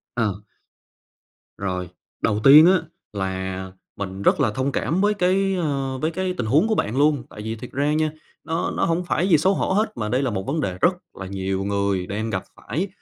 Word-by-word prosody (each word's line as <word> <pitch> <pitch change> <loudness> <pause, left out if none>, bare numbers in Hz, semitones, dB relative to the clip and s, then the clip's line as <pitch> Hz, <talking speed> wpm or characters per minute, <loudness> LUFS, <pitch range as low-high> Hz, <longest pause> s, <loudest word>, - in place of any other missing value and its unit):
Ờ. 105 -4 -1 1.2
Rồi, 90 -2 -3 0.3
đầu 105 - +1
tiên 150 +4 +10
á 185 -1 +5 0.3
là 95 -1 -4 0.2
mình 95 -1 -5
rất - - +3
là 125 -6 +3
thông 130 +6 -2
cảm 165 +7 0
với 205 +1 +3
cái, 195 0 +2
ơ, 140 -6 -2
với 155 +4 0
cái 185 +2 -2
tình - - -1
huống 150 - +3
của 220 - +2
bạn 115 - -1
luôn. 145 -3 +3
Tại 105 - -9
vì 110 +1 -4
thiệt 120 +3 -9
ra 145 +3 +1
nha, 155 0 +1 0.3
nó 165 +3 -1
nó - - 0
hổng 170 +2 0
phải 175 +1 0
gì 165 -5 +5
xấu 190 +6 +3
hổ - - 0
hết 215 +3 +1
mà 105 -2 -2
đây 125 +4 +1
là 130 - 0
một 95 -2 -2
vấn 155 +3 -1
đề 90 -9 -3
rất 180 - +4 0.2
là 95 - -7
nhiều 95 0 -2
người 100 -2 0
đang 110 +3 -3
gặp 95 -2 -2
phải, 180 +7 -3
130 Hz, 215 wpm, -23 LUFS, 100-165 Hz, 1.2 s, tiên